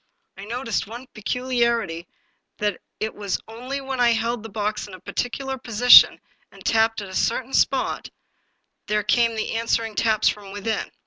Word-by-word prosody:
I 195 - -9
noticed 230 -1 -2
one 240 +4 -9
peculiarity, 235 -6 -1 0.5
that 205 -3 -2 0.2
it 220 0 -2
was 200 -3 -3
only 250 +5 -5
when 265 -1 -4
I 240 -1 +5
held 230 +1 -1
the 225 - -9
box 210 0 -3
in 195 - -10
a - - -13
particular 265 +7 -4
position, 240 0 +7 0.3
and 195 -1 -16
tapped 225 0 +2
at - - -8
a - - -10
certain 255 +5 -1
spot", 265 -1 +1 0.8
there 210 -1 +1
came 230 +2 +2
the 220 - -2
answering 230 -1 0
taps 215 0 +2
from 200 -2 -2
within. 205 +2 -3
225 Hz, 165 wpm, -23 LUFS, 210-245 Hz, 0.8 s, position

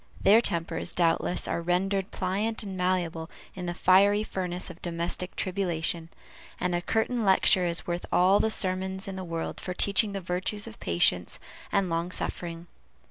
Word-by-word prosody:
Their 215 +4 +6
tempers, 170 -4 0
doubtless, 170 +1 +1
are - - -1
rendered 190 +3 0
pliant 205 +5 -2
and 195 -2 -6
malleable 175 -3 -1 0.2
in 180 -2 -6
the 175 - -3
fiery 200 +3 +4
furnace 180 -3 -3
of 175 - -16
domestic 175 +1 -3
tribulation, 175 -3 -1 0.5
and 180 0 -1
a 175 - 0
curtain 225 +5 0
lecture 190 -2 +4
is 170 0 +2
worth 175 0 -3
all 185 +3 +4
the 220 - +2
sermons 190 -1 0
in 195 - -5
the 190 - -5
world 165 -2 -4
for 180 - -5
teaching 200 +2 +3
the 195 - -2
virtues 185 +3 -2
of 110 - -11
patience 85 +1 +1 0.3
and 195 -1 +2
long 165 +1 -1
suffering. 170 -2 -3
180 Hz, 165 wpm, -27 LUFS, 170-195 Hz, 0.5 s, Their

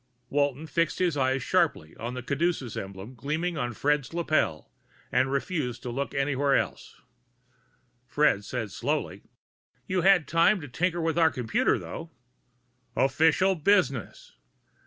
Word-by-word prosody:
Walton 145 +1 0
fixed 165 +1 0
his 180 -4 +1
eyes 130 -1 +1
sharply 165 - 0
on 120 +2 -5
the 125 - -5
caduceus 140 -3 -1
emblem 95 +4 -7
gleaming 160 +7 -2
on 120 -5 -2
Fred's 145 +4 0
lapel, 155 - 0 0.4
and 135 +1 +2
refused 135 - -2
to 125 - -4
look 140 +4 -3
anywhere 140 0 +1
else. - - -3 1.1
Fred 145 -9 +2
said 110 -2 -4
slowly, - - -2 0.6
"You 185 -1 0
had 190 -3 +4
time 170 +5 +4
to 145 - -7
tinker 175 +6 -1
with 165 +1 0
our 165 -1 +6
computer, 125 -6 +1
though." 165 0 -7 0.9
"Official 160 +7 +3
business!" 170 - 0
145 Hz, 135 wpm, -27 LUFS, 125-165 Hz, 1.1 s, our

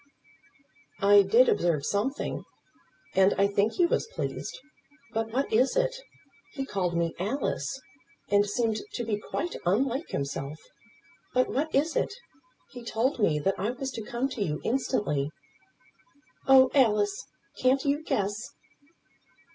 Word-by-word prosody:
"I 200 +1 +7
did 230 +6 +5
observe 160 -5 +1
something, 230 - -2 0.7
and 190 +1 +4
I 195 - +4
think 200 +2 +1
he 350 - +3
was 340 - 0
pleased. - - -5 0.6
But 225 0 -1
what 265 +2 -1
is 250 +4 +3
it? - - +1 0.6
He 270 -2 -3
called 180 -8 -1
me 170 -1 0
Alice. 265 +6 -2 0.5
And 205 0 +5
seemed 220 +1 0 0.2
to 240 - -2
be 215 -2 -1
quite 345 +10 -4
unlike 255 - 0
himself. 140 +1 -4 0.8
But 255 0 +3
what 305 +4 -1
is 305 +4 +2
it? 400 - 0 0.6
He 245 -2 -9
told 235 +4 0
me 160 -8 +3
that 195 +5 0
I 205 +4 0
was 265 +2 -4
to 230 - -5
come 240 +4 -2
to 235 - -6
you 150 -6 -1
instantly." 205 - 0 1.2
"Oh, 260 -1 +7
Alice, 210 -7 +2 0.3
can't 260 +2 +3
you 285 +2 +1
guess?" 200 -7 0
225 Hz, 140 wpm, -28 LUFS, 200-270 Hz, 1.2 s, I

